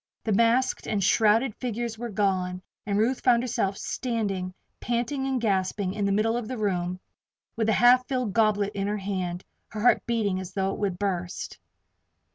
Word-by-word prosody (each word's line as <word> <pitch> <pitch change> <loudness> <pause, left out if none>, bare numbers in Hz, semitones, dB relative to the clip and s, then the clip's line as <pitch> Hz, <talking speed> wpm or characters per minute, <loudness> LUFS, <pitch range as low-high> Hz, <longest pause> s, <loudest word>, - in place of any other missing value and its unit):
The 220 - 0
masked 235 +5 +2
and 205 -2 0
shrouded 220 +4 +3
figures 235 -2 -3
were 240 0 -4
gone, 185 -3 -1 0.2
and 200 -1 0
Ruth 235 +5 +1
found 240 -2 +4
herself 200 -5 -1
standing, 205 -7 -2 0.3
panting 245 +3 -1
and 265 -1 0
gasping, 190 -3 0
in 205 -1 -1
the 200 - +1
middle 215 +3 +2
of 240 -2 -3
the 255 - -4
room, 185 -4 -1 0.6
with 225 -2 0
the 220 - +3
half 250 +2 +5
filled 250 -6 -1
goblet 210 -2 +2
in 195 0 -2
her 210 +1 -1
hand, 185 -3 -3 0.2
her 215 - -6
heart 245 - +4
beating 215 -5 0
as 185 0 -7
though 195 -1 0
it - - -7
would 195 -4 -1
burst. 180 -2 -3
210 Hz, 180 wpm, -26 LUFS, 195-235 Hz, 0.6 s, half